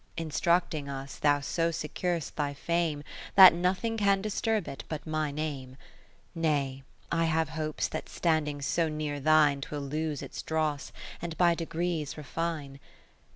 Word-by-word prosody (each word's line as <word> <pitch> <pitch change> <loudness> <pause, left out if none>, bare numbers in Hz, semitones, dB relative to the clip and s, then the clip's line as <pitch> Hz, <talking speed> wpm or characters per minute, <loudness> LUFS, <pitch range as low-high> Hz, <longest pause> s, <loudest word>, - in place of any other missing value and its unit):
Instructing 165 -2 0
us 135 0 -6
thou 145 -1 +3
so 165 +3 0
secur'st 165 +1 -3
thy 145 -3 -1
fame. 165 -1 -1 0.3
That 190 -3 +11
nothing 185 +6 0
can 200 -2 +3
disturb 215 0 -1
it 135 - -6
but 155 -2 -5
my 155 -1 -1
name; 140 -3 -4 0.6
30 165 - -6
Nay, 135 -3 0 0.3
I 165 0 +2
have 160 -1 +1
hopes 155 -1 -2
that - - -5
standing 150 -4 0
so 165 +3 +1
near 150 -1 -3
thine 150 -1 +4
'Twill 145 +1 -4
lose 150 +1 -3
its - - -6
dross, 155 -2 -1 0.3
and 165 -1 -5
by 175 -1 +5
degrees 165 -2 -2
refine. 150 -2 -4
155 Hz, 150 wpm, -29 LUFS, 145-170 Hz, 0.6 s, That